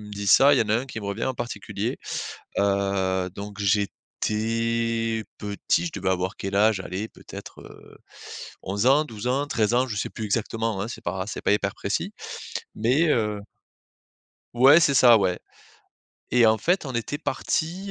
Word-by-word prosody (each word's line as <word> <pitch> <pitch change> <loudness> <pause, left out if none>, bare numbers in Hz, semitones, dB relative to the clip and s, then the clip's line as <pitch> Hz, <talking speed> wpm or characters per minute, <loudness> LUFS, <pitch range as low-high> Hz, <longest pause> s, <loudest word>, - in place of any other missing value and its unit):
me 105 0 -10
dis 100 0 -5
ça, 140 +7 +7
il - - +2
y - - +5
en 110 - -7
a 110 - +3
1 130 +3 -3
qui 115 - -6
me 100 - -6
revient 100 +3 -2
en 130 - -1
particulier. 120 0 -4 0.6
Heu, 95 -2 +1
donc 100 +1 -8
j'étais 115 +2 -1
petit 105 +11 -1
je 165 - -4
devais - - -2
avoir 95 +2 -1
quel 100 0 -3
âge? 105 -1 +4
Allez, 95 +4 -4
peut-être, - - -11
heu, - - -15 0.6
11 100 +4 -1
ans, 140 +4 +5
12 110 -6 -8
ans, 140 +3 +1
13 115 -1 +1
ans. 125 +1 +3
Je 110 - -3
sais 100 - -2
plus 110 - -6
exactement, 110 -1 -1
hein, 110 - -4
c'est - - -8
pas 95 +2 -2
c'est - - -5
pas - - +3
hyper 100 -1 0
précis - - -2 0.6
mais, 130 +10 +2
heu 105 -4 0 1.1
Ouais. 135 +7 +7
C'est 145 -3 +3
ça, 120 -3 +7
ouais. 90 -3 0 0.9
Et 120 -2 +6
en 110 0 +4
fait 175 - +1
on 135 - -5
était 120 +4 -3
parti, 175 +5 -2
110 Hz, 180 wpm, -25 LUFS, 100-125 Hz, 1.1 s, ça